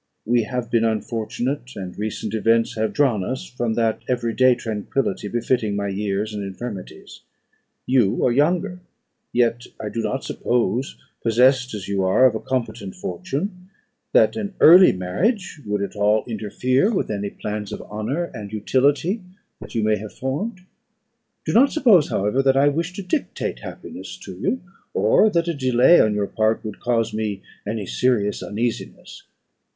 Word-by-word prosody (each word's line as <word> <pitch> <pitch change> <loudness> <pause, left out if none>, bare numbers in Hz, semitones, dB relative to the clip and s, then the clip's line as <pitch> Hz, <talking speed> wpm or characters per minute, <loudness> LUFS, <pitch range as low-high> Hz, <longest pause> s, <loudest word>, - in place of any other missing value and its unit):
We 120 +1 +3
have 125 -1 -4
been 115 -1 +3
unfortunate, 120 +4 -2
and 95 -2 -6
recent 110 0 -4
events 115 +1 +2
have 110 0 0
drawn 125 -9 +2
us 130 - -4
from 120 -2 -2
that 115 -1 0
every 120 -2 0
day 130 0 +5
tranquillity 110 -1 -2
befitting 115 -1 0
my 100 0 -2
years 100 +2 -2
and 105 -1 -4
infirmities. 100 0 -8 0.6
You 125 -6 +2
are 125 - +3
younger; 170 +7 +1 0.5
yet 120 0 +1
I 105 - -4
do 115 - -3
not 115 +5 -2
suppose, 125 +2 -1 0.2
possessed 125 +1 +3
as 95 -3 -6
you 100 -1 0
are 95 +8 +4
of 130 - +5
a 110 - -2
competent 115 -6 -3
fortune, 185 0 -5 0.4
that - - +4
an 205 -3 -4
early 180 +3 +9
marriage 155 - -1
would 105 -1 -1
at 100 0 -5
all 105 +1 +2
interfere 125 - 0
with 190 - -1
any 100 -1 -2
future - - -24
plans 105 -1 -4
of - - -6
honour 110 +11 -3
and 105 -4 -7
utility 140 - +1 0.4
that 105 +1 -11
you 115 - +1
may 110 0 +2
have 105 0 -8
formed. 185 - -3 0.8
Do - - -1
not 275 +5 +5
suppose, 220 - +4
however, 105 +7 +1
that 135 0 +3
I 140 +1 +5
wish 165 +4 -2
to 200 - -6
dictate 185 +11 -2
happiness - - -9
to - - -8
you, 260 - -1 0.3
or 110 - +4
that 170 -3 0
a 170 - 0
delay 130 +3 +5
on 105 -1 +2
your 105 -1 0
part 110 +2 0
would 105 -2 -6
cause 115 -2 0
me 105 -3 -3 0.2
any 105 -1 -3
serious 105 -1 0
uneasiness. 115 +3 -5
120 Hz, 165 wpm, -22 LUFS, 105-135 Hz, 0.8 s, early